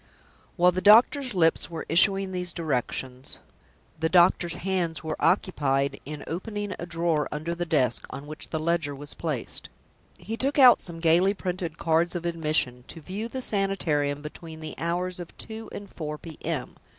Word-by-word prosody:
While 180 0 +5
the 185 +1 -2
doctor's 240 +4 +6
lips 165 -2 +2
were 165 -1 -6
issuing 195 +3 +3
these 180 -1 0
directions, 130 -5 -3 0.6
the 160 0 +1
doctor's 175 -1 +4
hands 175 -4 -2
were 160 -1 -2
occupied 140 -8 +1
in 150 -1 -6
opening 205 +3 -4
a 175 - -5
drawer 165 -3 0
under 155 +3 -3
the 175 0 -3
desk 125 -9 +1
on 140 - -7
which 155 +1 -7
the 160 - -2
ledger 160 -3 0
was 145 +1 -8
placed. 150 -8 -2 0.5
He 225 +2 -5
took 275 +5 0
out 255 -3 +8
some 165 -2 -4
gayly 175 +5 +4
printed 180 -4 -4
cards 165 +2 +1
of 175 -1 -3
admission 155 -7 0
"to 165 - -9
view 195 +8 -5
the 260 +2 -4
Sanitarium, 155 -9 0
between 160 +1 -9
the 155 -1 -6
hours 175 +2 -2
of 175 -1 -9
two 225 0 -6
and 200 - -7
four 150 -4 -6
P.M. 160 -3 -5
170 Hz, 165 wpm, -26 LUFS, 155-185 Hz, 0.6 s, out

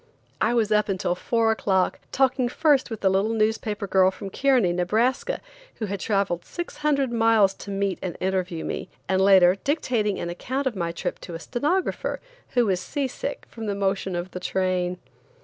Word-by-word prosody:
I 240 - +2
was 220 -2 +1
up 210 0 +3
until 185 -2 0
four 225 +4 +1
o'clock, 190 -4 +1
talking 260 -2 +2
first 285 0 +2
with 220 -3 -5
a - - +6
little 195 +4 +1
newspaper 215 -1 0
girl 190 -1 +4
from 195 +1 -7
Kearney, 255 -10 +3
Nebraska, 235 - 0 0.3
who 220 - -3
had 200 -1 -4
traveled 195 -4 0
six 345 0 -6
hundred 280 -4 +1
miles 225 -4 +4
to - - -8
meet 195 -1 -1
and 180 -2 -4
interview 185 -3 -1
me, - - -4 0.2
and 190 0 +2
later 190 -1 +6
dictating 240 -9 0
an 170 - -3
account 260 +10 -3
of 255 -4 -1
my 170 -3 -2
trip 170 - -4
to 170 - -8
a - - -5
stenographer, 295 - -1 0.4
who 245 -1 +4
was 190 -3 +1
sea 280 +7 -2
sick - - -5
from 225 -2 -7
the 200 - -1
motion 195 -1 -1
of 175 +1 -4
the 180 - -5
train. 180 -1 -1
205 Hz, 185 wpm, -25 LUFS, 185-240 Hz, 0.4 s, a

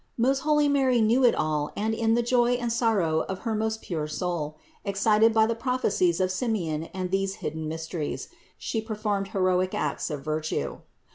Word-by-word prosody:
Most 265 +3 +2
holy 300 0 +3
Mary 265 -4 +3
knew 230 +4 +3
it 245 - +5
all 150 -1 -1
and 220 +2 0
in 225 0 +2
the 240 - +2
joy 240 0 +3
and 240 -2 -1
sor 230 -2 +2
row 160 -4 +1
of 190 -1 -4
her 225 - 0
most 220 +1 -2
pure 155 -4 -3
soul, 155 -2 -3 0.3
excited 210 +3 +3
by 220 0 +4
the 230 - 0
prophecies 225 -8 +1
of 185 0 +1
Simeon 185 -8 -1
and 185 +1 -5
these 195 0 0
hidden 160 -5 -4
mysteries, 160 -1 -4 0.3
She 225 - -2
performed 210 -3 -2
heroic 185 -2 +1
acts - - -2
of 145 -3 -5
virtue. 155 0 -2
205 Hz, 185 wpm, -26 LUFS, 170-230 Hz, 0.3 s, it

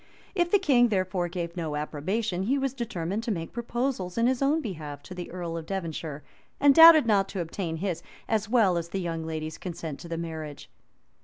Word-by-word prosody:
If 350 -3 +1
the 410 - +5
king, 270 -10 +4
therefore, 185 -4 0
gave 170 -1 -4
his 180 - -6
approbation 160 +7 -2
he 250 +9 +1
was 270 -2 -1
determined 210 -6 -3
to 230 - -5
make 165 -5 -4
proposals 235 -5 -2
in 230 - +3
his 255 +1 +1
own 285 +3 +3
behalf 155 - -6
to - - -9
the 180 -1 -6
earl 175 -2 -5
of 160 -1 -7
Devonshire, 160 -6 -4 0.4
and 285 0 +6
doubted 325 -2 +9
not 200 -3 +3
to 195 - -5
obtain 170 0 -3
his, 180 -1 -2 0.3
as 215 -1 0
well 210 -8 +4
as 170 0 -7
the 195 - -3
young 165 -3 -3
lady's, 155 0 -5
consent 165 -5 -6
to 170 - -9
the 165 0 -4
marriage. 160 -3 -6
185 Hz, 205 wpm, -27 LUFS, 165-235 Hz, 0.4 s, doubted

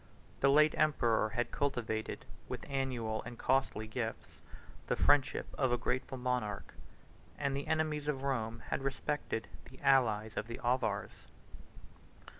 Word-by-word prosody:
The 140 - +4
late 150 +2 +6
emperor 120 -8 +3
had 120 +2 -1
cultivated, 115 -6 -2 0.2
with - - -5
annual 125 -5 -1
and 120 - -8
costly 130 -4 +1
gifts, 110 +1 -5 0.5
the - - +2
friendship 145 -1 +3
of 130 -3 +3
a 125 - +3
grateful 130 +2 -2
monarch, 125 -5 -2 0.6
and 140 -1 0
the 140 - -3
enemies 155 -2 0
of 135 -3 -1
Rome 115 -4 -1
had - - 0
respected 135 -3 -2 0.2
the 130 - -15
allies 110 -5 +3
of 110 - -2
the 115 - -6
Avars. 120 -5 -1
125 Hz, 135 wpm, -34 LUFS, 110-140 Hz, 0.6 s, late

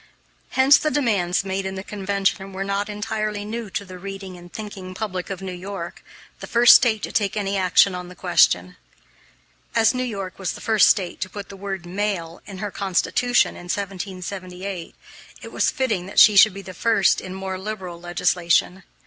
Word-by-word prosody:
Hence 265 +2 +7
the 305 - 0
demands 200 -11 +1
made 195 0 -2
in 190 0 -4
the 190 - -5
convention 195 -1 -2
were 190 +1 -3
not 200 +1 -2
entirely 210 0 -3
new 225 0 -5
to 200 - -4
the 185 -1 -10
reading 195 0 -7
and 175 0 -13
thinking 195 -4 -8
public 185 -4 -4
of 195 -1 -6
New 190 - -4
York 180 -1 -7 0.4
the - - -8
first 240 +1 +7
State 220 -4 +3
to - - -3
take 210 -3 0
any 200 -1 -1
action 185 +1 +4
on 180 0 -6
the 180 - -12
question. - - +2 1.0
As 225 -1 +4
New 255 - -2
York 200 -7 -5
was 185 -3 -2
the - - -9
first 220 -2 +4
State 185 -4 0
to 185 - -2
put 200 +1 -8
the 200 - -9
word 195 -2 -5
"male" 180 -3 -3
in 195 -2 -8
her 205 +1 -4
constitution 200 +6 +1
in 175 - -11
1778, 185 -1 -5 0.5
it - - -9
was - - +1
fitting 225 -11 -1
that 195 - -10
she 210 - +8
should 195 0 +7
be 195 - -7
first 195 +2 +2
in 185 0 -7
more 190 -1 -4
liberal 190 -4 -6
legislation. 175 +1 +1
195 Hz, 185 wpm, -22 LUFS, 185-210 Hz, 1.0 s, she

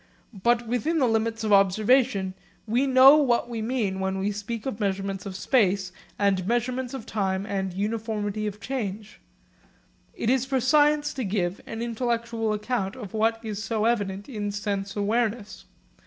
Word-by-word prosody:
But 235 +4 +1
within 265 +8 0
the 265 -5 +3
limits 225 0 0
of 215 -1 +2
observation 200 +1 +3 0.3
we 240 +5 +1
know 265 +2 +8
what 245 -6 +2
we 235 -2 -4
mean 215 -5 -1
when 190 0 -1
we 195 +2 -1
speak 210 +2 -5
of 260 -6 -4
measurements 195 -1 -2
of 190 - -6
space 195 -4 +1 0.3
and 195 -3 +1
measurements 245 +2 -1
of 240 -5 -7
time 190 -2 -1
and 195 -2 -2
uniformity 215 +1 -2
of 210 0 -6
change. 215 -5 -5 1.0
It 230 - 0
is 260 -2 +2
for 265 0 0
science 295 +3 +3
to 260 - -3
give 190 -2 -1
an 225 +1 -4
intellectual 235 -1 -1
account 210 -2 -2
of 215 -7 -9
what 225 +1 +1
is 210 -1 -4
so 220 -1 -1
evident 205 -4 -1
in 210 -5 -3
sense 200 -1 -3
awareness. 215 +1 -1
220 Hz, 160 wpm, -26 LUFS, 200-240 Hz, 1.0 s, know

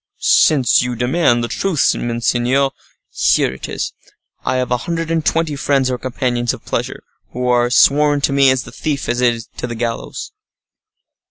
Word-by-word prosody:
"Since 130 -7 +4
you 125 0 -2
demand 125 0 +1
the - - -1
truth, 180 +2 +1
monseigneur, 120 +3 0 0.4
here - - +2
it 65 - -8
is:—I 130 - -6
have 125 -1 -1
a 125 - +2
hundred 165 -1 -2
and 165 -1 0
twenty 165 -2 0
friends 135 -2 +1
or 125 - -3
companions 120 -1 -1
of - - -18
pleasure, - - -3 0.3
who 125 +1 -2
are 120 -1 +2
sworn 145 +4 +4
to 140 - +1
me 140 -1 +5
as 130 -1 +1
the - - -12
thief 145 -3 -3
is 120 -1 0
to - - -4
the 120 - -5
gallows." 115 0 -4
125 Hz, 165 wpm, -17 LUFS, 120-140 Hz, 0.4 s, me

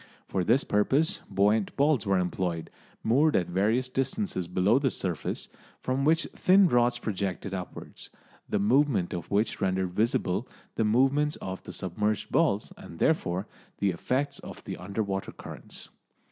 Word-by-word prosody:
For 95 - -1
this 120 +8 +3
purpose 135 +10 +2
buoyant 105 +1 +2
balls 140 -7 +2
were 95 -1 +3
employed, 90 -2 -2 0.3
moored 145 +7 +3
at 90 - +3
various 105 +9 +1
distances 135 - -2
below 95 +7 +3
the 140 -2 +2
surface, 90 - -3 0.3
from 130 +2 -1
which 160 +2 +3
thin 190 +1 +5
rods 120 -4 +3
projected 100 -3 -3
upwards, 90 -2 -7 0.4
the - - +1
movement 110 -2 +2
of 85 - -5
which 105 +3 0
rendered 95 -1 0
visible 110 0 0 0.3
the 110 - 0
movements 135 +7 +3
of 95 0 -6
the - - -9
submerged 105 +4 -2
balls 100 +1 +1
and 85 - -11
therefore 95 - +1 0.3
the 100 -1 +1
effects 135 - -1
of - - -10
the - - -5
under 100 +4 -3
water 95 -1 -3
currents. - - -10
105 Hz, 150 wpm, -28 LUFS, 95-135 Hz, 0.4 s, thin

